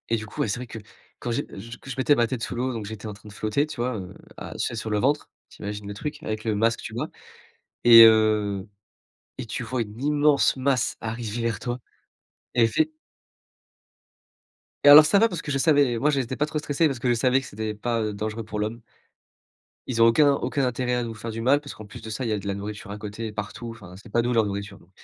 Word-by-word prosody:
Et 115 - +3
du 110 -1 -4
coup, 105 - -5
ouais, - - +1
c'est 100 +3 -2
vrai 125 - -7
que 115 0 -8 0.4
quand 120 - -3
j'ai 115 - -1
je 115 +4 -9
que - - -13
je 130 - -4
mettais 130 +2 +4
ma 120 -2 +2
tête 120 0 -4
sous - - -4
l'eau, 125 +2 -1
donc 110 -3 -5
j'étais 110 +1 -7
en 105 - -5
train 105 +1 -14
de - - -12
flotter, 110 +8 0
tu 145 - -8
vois, 120 +1 -1
heu, 95 -1 -8 0.2
à - - -7
tu - - -9
sais, - - -3
sur 110 0 -4
le 105 -1 +1
ventre, 145 +6 +1 0.2
tu - - -16
imagines 105 0 -5
le 100 - -5
truc 145 +9 -6
avec 110 0 -4
le 110 -2 0
masque, 115 +2 +1
tubas - - -4 0.8
et 115 -1 +10
heu 110 -3 +4 0.7
et 130 - -4
tu 115 - -4
vois 120 +1 -2
une 105 0 -7
immense 145 0 +3
masse 130 -1 +1
arriver 115 0 -4
vers 115 -1 -1
toi 120 0 -4 0.8
et 120 - +5
effe 115 - 0 2.1
Et 145 - +8
alors 150 +1 +11
ça 200 +6 +4
va 230 +2 +4
parce 175 -5 -5
que 145 - -4
je 135 - 0
savais 140 -5 +3
moi, 150 - +2
j'étais 135 -3 -1
pas 150 +3 0
trop 155 0 -3
stressé 150 +1 +1
parce 135 -4 -3
que 120 - -3
je 120 - +4
savais 130 +2 +3
que - - -11
c'était 110 -2 -5
pas, 115 +2 -1
heu, 105 -1 -2
dangereux 110 +2 -4
pour 105 0 -6
l'homme. 110 +3 -3 1.1
Ils 115 -3 0
ont - - +8
aucun 145 +5 +5
aucun 140 0 -1
intérêt 125 0 -1
à 125 0 0
nous 115 -1 -5
faire 115 +2 -6
du 115 +1 -5
mal 135 +5 +4
parce 145 -1 -9
qu'en 110 - -11
plus 105 - -11
de 110 - -8
ça, 110 +4 -4
il 120 - -1
y - - +1
a 105 - -1
de 100 - -8
la 100 - 0
nourriture 100 0 -7
à 105 - -5
côté, 105 +2 -5
partout, 105 +3 -6
enfin, 90 -6 -12
c'est 105 +2 -14
pas 120 - +3
nous 120 +1 -1
leur 115 -2 +3
nourriture, 100 0 -5
donc 85 - -22
115 Hz, 260 wpm, -25 LUFS, 105-130 Hz, 2.1 s, alors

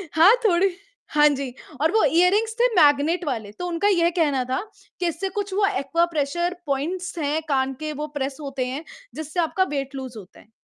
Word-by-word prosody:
हाँ, 360 +9 +7
थोड़ी 380 0 +4 0.4
हाँ 300 0 +5
जी, 275 -3 -3 0.3
और 320 - +3
वो 440 +2 +3
ईयररिंग्स 395 +7 +3
थे 485 - +5
मैग्नेट 305 +2 +4
वाले, 225 -8 -3
तो 355 +12 -6
उनका 345 +3 0
ये 345 -4 +3
कहना 280 -5 +2
था 260 - 0 0.4
कि 355 - 0
इससे 385 +3 -2
कुछ 405 -1 -4
वो 400 +1 +3
एक्वाप्रेशर 340 0 0
पॉइंट्स 335 +7 -3
हैं 300 +2 0
कान 265 -1 +1
के 310 0 -3
वो 300 +1 -4
प्रेस 270 0 -3
होते 275 -2 -3
हैं, 270 +5 -4 0.3
जिससे 315 +3 -4
आपका 345 +3 +2
वेट 275 0 -3
लूज़ 260 -3 -7
होता 195 -3 -13
है। 215 - -20
310 Hz, 190 wpm, -23 LUFS, 275-360 Hz, 0.4 s, हाँ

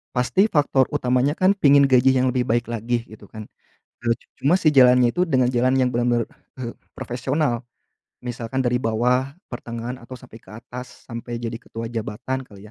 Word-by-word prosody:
pasti 125 - +2
faktor 140 -4 +3
utamanya 125 +3 +1
kan 185 +1 +4
pengen 140 -5 +6
gaji 130 0 +5
yang 130 0 +2
lebih 125 -1 0
baik 120 +1 0
lagi 115 +1 -2
gitu 110 -1 -14
kan. 110 -1 -8 0.6
Eee, 115 - +3 0.3
cuma 140 - +2
si 155 - +4
jalannya 125 -2 +6
itu 180 - +3
dengan 130 -4 +3
jalan 125 +1 +2
yang 130 - +3
benar-benar, 120 -1 +1 0.3
eee, 120 -2 -5 0.2
profesional. 130 0 -2 0.6
Misalkan 120 +1 -3
dari 125 0 +2
bawah, 125 +4 +1 0.2
pertengahan, 120 0 -6
atau 130 +2 -10
sampai 125 -3 -14
ke - - -20
atas, 125 +3 -10
sampai 120 0 -6
jadi 115 0 -4
ketua 115 0 -7
jabatan 120 +3 -4
kali 100 -3 -15
125 Hz, 170 wpm, -22 LUFS, 115-130 Hz, 0.6 s, pengen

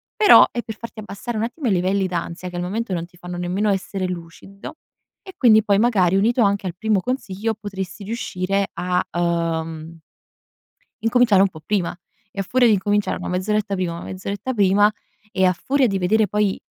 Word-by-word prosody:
però 425 -2 +8
è 240 - -3
per 220 -2 -7
farti 230 0 -9
abbassare 215 +2 -6
un 215 - -1
attimo 245 +4 -3
i - - +2
livelli 190 +2 +1
d'ansia 180 0 -4
che 175 - -7
al - - -2
momento 205 +4 -3
non 170 -1 -2
ti 175 - -23
fanno 175 0 -8
nemmeno 185 +4 -1
essere 195 0 -2
lucido, 180 - -9 0.5
e 380 - -12
quindi 220 -4 +5
poi 200 -1 +2
magari 200 -5 +3
unito 235 +5 +2
anche 200 -2 +1
al 175 - -5
primo 215 0 +1
consiglio, 225 -2 -3
potresti 200 -2 -7
riuscire 195 -3 -2
a, 180 0 0
ehm 165 -1 -2 1.0
incominciare 225 -4 +4
un 195 - +4
po' 160 -3 -13
prima, 195 -5 -1 0.4
e 195 - -5
a - - +1
furia 245 +6 +2
di 220 - +5
incominciare 205 +1 0
1 - - -6
mezz'oretta 200 +2 -1
prima 185 -2 -2
1 170 - -7
mezz'oretta 195 +6 -5
prima, 205 0 +4 0.4
e 190 -2 +1
a 180 - +5
furia 265 +8 +1
di 195 -3 -1
vedere 210 +4 +2
poi, 205 0 0
195 Hz, 190 wpm, -21 LUFS, 180-215 Hz, 1.0 s, però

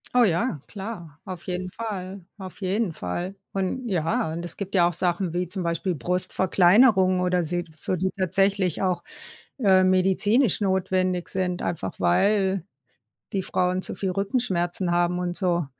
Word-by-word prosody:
Oh 250 - +6
ja, 175 - +1
klar, 190 -7 -8
auf 185 -3 -7
jeden 185 0 -3
Fall, 195 -3 -5 0.2
auf 190 0 -10
jeden 195 0 0
Fall. 175 - -4 0.2
Und 195 +6 -2
ja 165 -3 0
und 170 +2 -4
es 175 - -5
gibt 200 -1 -6
ja 175 -2 +5
auch 175 - -2
Sachen 175 +1 0
wie 180 +1 -1
zum 185 +1 -4
Beispiel 170 +2 -1
Brustverkleinerung 185 - +3
oder 180 -1 +1
se 175 +2 -1
so, 155 +4 -2
die 190 +2 -1
tatsächlich 195 -1 +1
auch, 180 -3 0 0.6
ähm, 190 -4 +5
medizinisch 195 +5 +3
notwendig 185 -2 0
sind, 180 -1 -1
einfach 125 - -3
weil 195 - +2 0.7
die 195 -1 0
Frauen 185 +1 0
zu - - -4
viel 190 -2 -1
Rückenschmerzen 190 -4 -1
haben 175 +1 +2
und 175 -1 -2
so, 175 -4 0
185 Hz, 155 wpm, -25 LUFS, 175-195 Hz, 0.7 s, Oh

